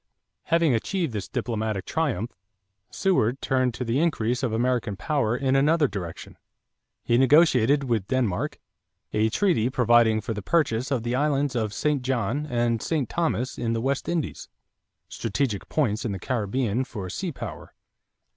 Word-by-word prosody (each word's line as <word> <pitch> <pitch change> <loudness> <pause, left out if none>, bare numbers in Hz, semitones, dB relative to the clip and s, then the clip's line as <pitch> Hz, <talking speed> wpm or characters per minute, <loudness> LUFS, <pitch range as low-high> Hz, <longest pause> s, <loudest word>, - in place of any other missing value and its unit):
= - - -57
Having 165 -4 +3
achieved 160 - -1
this 105 -3 -4
diplomatic 110 -5 -2
triumph, 125 - -1 0.6
Seward 135 - +1
turned 130 -3 0
to 125 - -4
the 120 +4 0
increase 125 -7 0
of 125 -4 0
American 120 -2 0
power 125 - 0
in 135 0 +1
another 150 +2 +4
direction. 95 -7 -7 0.7
He 120 +1 +2
negotiated, 140 -1 +5
with 115 -7 -1
Denmark, 120 -9 -1 0.5
a 110 +1 +2
treaty 125 - +2
providing 120 -3 +4
for 115 - -4
the 105 - -5
purchase 125 - +1
of 130 -5 -1
the 120 +1 -2
islands 140 0 +1
of 110 -3 0
St. 145 +5 0
John 130 +3 -1
and 120 -3 0
St. 150 -7 -1
Thomas 155 -7 -1
in 115 -1 -1
the 115 - 0
West 135 +3 -1
Indies, 170 -3 -3 0.6
strategic 115 -2 -2
points 120 -8 0
in 110 - -2
the - - -3
Caribbean 120 +2 -1
for 105 -7 -6
sea 175 - -4
power. 105 - -8
125 Hz, 155 wpm, -25 LUFS, 110-140 Hz, 0.7 s, negotiated